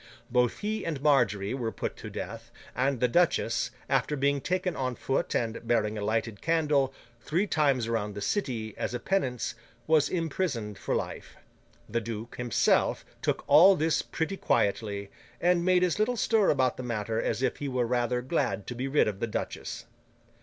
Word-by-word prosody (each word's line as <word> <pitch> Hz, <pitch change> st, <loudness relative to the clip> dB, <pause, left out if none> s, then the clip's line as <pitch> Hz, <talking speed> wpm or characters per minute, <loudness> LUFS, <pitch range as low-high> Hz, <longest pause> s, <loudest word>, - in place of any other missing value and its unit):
Both 125 Hz, -1 st, +2 dB
he 215 Hz, 0 st, -2 dB
and 155 Hz, -4 st, -3 dB
Margery 120 Hz, -8 st, +2 dB
were 120 Hz, -4 st, -2 dB
put -, -, -4 dB
to -, -, -8 dB
death, 115 Hz, +4 st, -7 dB, 0.3 s
and 135 Hz, 0 st, +1 dB
the 125 Hz, -, +3 dB
duchess, 175 Hz, +6 st, +2 dB, 0.2 s
after 150 Hz, -, +1 dB
being 140 Hz, 0 st, +1 dB
taken 180 Hz, +1 st, -1 dB
on 130 Hz, -2 st, -2 dB
foot 135 Hz, -, -1 dB
and 115 Hz, -1 st, -1 dB
bearing 110 Hz, -2 st, +1 dB
a 105 Hz, -, -4 dB
lighted 110 Hz, 0 st, -1 dB
candle, 150 Hz, -5 st, +2 dB, 0.3 s
three 165 Hz, -, 0 dB
times 140 Hz, -, +2 dB
round 105 Hz, -3 st, -2 dB
the -, -, -4 dB
City, 115 Hz, -, -2 dB
as 125 Hz, -, -2 dB
a -, -, -2 dB
penance, 130 Hz, -, -1 dB, 0.3 s
was 155 Hz, -2 st, +3 dB
imprisoned 145 Hz, -, -2 dB
for -, -, -1 dB
life. -, -, -5 dB, 0.5 s
The 115 Hz, +2 st, -1 dB
duke, 115 Hz, +1 st, -6 dB
himself, 120 Hz, -2 st, +2 dB, 0.2 s
took -, -, -1 dB
all 175 Hz, +7 st, +8 dB
this 155 Hz, -1 st, +1 dB
pretty 180 Hz, +5 st, -3 dB
quietly, 100 Hz, -, 0 dB, 0.3 s
and 175 Hz, 0 st, +3 dB
made 180 Hz, 0 st, +4 dB
as 180 Hz, +2 st, +1 dB
little 240 Hz, +3 st, +1 dB
stir 220 Hz, -2 st, +3 dB
about 130 Hz, -3 st, +2 dB
the -, -, -4 dB
matter 115 Hz, -2 st, -2 dB
as 130 Hz, -, -1 dB
if -, -, 0 dB
he 145 Hz, -, -4 dB
were 125 Hz, -2 st, 0 dB
rather 125 Hz, +1 st, 0 dB
glad 105 Hz, -, -1 dB
to -, -, -5 dB
be 130 Hz, +3 st, -3 dB
rid 140 Hz, -2 st, +3 dB
of 100 Hz, -2 st, -3 dB
the 115 Hz, -, -1 dB
duchess. 115 Hz, -, -5 dB
125 Hz, 180 wpm, -28 LUFS, 115-160 Hz, 0.5 s, all